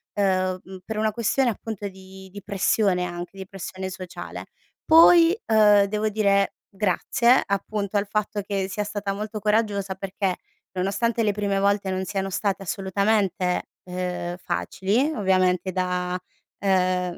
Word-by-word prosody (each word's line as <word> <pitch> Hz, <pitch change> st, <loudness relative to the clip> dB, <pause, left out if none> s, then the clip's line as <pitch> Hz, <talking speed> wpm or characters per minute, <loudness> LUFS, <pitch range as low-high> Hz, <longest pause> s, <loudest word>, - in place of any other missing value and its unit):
uhm, 185 Hz, -2 st, +1 dB
mhmm, 190 Hz, 0 st, -10 dB
per 220 Hz, -1 st, -4 dB
una 215 Hz, 0 st, +1 dB
questione 240 Hz, +3 st, +1 dB
appunto 210 Hz, -1 st, -5 dB
di 190 Hz, 0 st, -13 dB
di 205 Hz, 0 st, -9 dB
pressione 195 Hz, -1 st, +1 dB
anche, 175 Hz, 0 st, -5 dB
di 190 Hz, -, -6 dB
pressione 190 Hz, 0 st, -6 dB
sociale. 185 Hz, -1 st, -8 dB, 0.4 s
Poi, 335 Hz, +3 st, +7 dB
uhm, 210 Hz, -2 st, +6 dB
devo 210 Hz, +2 st, -1 dB
dire 200 Hz, -2 st, +2 dB, 0.2 s
grazie 235 Hz, +6 st, +3 dB
appunto 200 Hz, +1 st, -2 dB
al 200 Hz, 0 st, 0 dB
fatto 210 Hz, 0 st, -1 dB
che 195 Hz, -1 st, -2 dB
sia 210 Hz, +2 st, -3 dB
stata 205 Hz, -1 st, -3 dB
molto 215 Hz, +1 st, -5 dB
coraggiosa 210 Hz, -2 st, 0 dB
perché, 195 Hz, 0 st, -2 dB, 0.4 s
nonostante 200 Hz, +5 st, 0 dB
le 210 Hz, -2 st, +2 dB
prime 200 Hz, -1 st, -1 dB
volte 200 Hz, -1 st, +1 dB
non 185 Hz, 0 st, -2 dB
siano 195 Hz, 0 st, -3 dB
state 195 Hz, 0 st, -1 dB
assolutamente, 195 Hz, -1 st, 0 dB, 0.2 s
uhm, 180 Hz, -1 st, -4 dB
facili 200 Hz, -, -1 dB
ovviamente 185 Hz, -2 st, +2 dB
da 180 Hz, 0 st, -1 dB, 0.4 s
ehm, 185 Hz, -2 st, +1 dB
195 Hz, 140 wpm, -24 LUFS, 185-210 Hz, 0.4 s, Poi